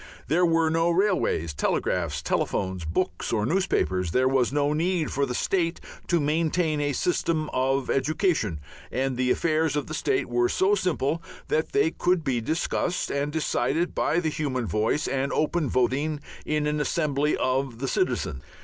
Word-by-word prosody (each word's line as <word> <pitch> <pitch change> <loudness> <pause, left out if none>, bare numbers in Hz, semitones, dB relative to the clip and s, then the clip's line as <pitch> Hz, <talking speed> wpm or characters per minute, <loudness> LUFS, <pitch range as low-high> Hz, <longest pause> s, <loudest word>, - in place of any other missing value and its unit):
There 175 +4 +4
were 165 -1 +2
no 165 +1 +2
railways, 175 - +1
telegraphs, 75 +1 -1
telephones, 95 -3 -1
books 80 - -2
or 105 -2 +1
newspapers, 110 - 0
there 130 +8 +2
was 130 -2 +2
no 145 +1 +1
need 165 0 0
for 140 0 0
the 125 - -3
state 170 +1 0 0.3
to 175 - +2
maintain 155 +1 +1
a 145 0 0
system 160 -1 0
of 135 +1 +1
education, 150 - 0 0.3
and 130 0 -1
the 125 0 0
affairs 155 +2 +1
of 145 - -1
the 155 - -7
state 140 -3 0
were 120 0 +1
so 195 +2 +2
simple 170 -5 0 0.3
that 155 - 0
they 185 -6 +3
could 180 -1 +1
be 125 -5 0
discussed 165 +6 -1
and 140 +1 -1
decided 160 +1 0
by 165 - +1
the 160 -2 0
human 135 -5 -2
voice 110 +7 0
and 135 +1 -1
open 155 -2 0
voting 140 +5 +1 0.3
in 150 -1 0
an 150 0 0
assembly 150 -1 +1
of - - -5
all 130 +1 +2
the 130 +1 -6
citizens. 65 - -1
150 Hz, 165 wpm, -26 LUFS, 130-165 Hz, 0.3 s, There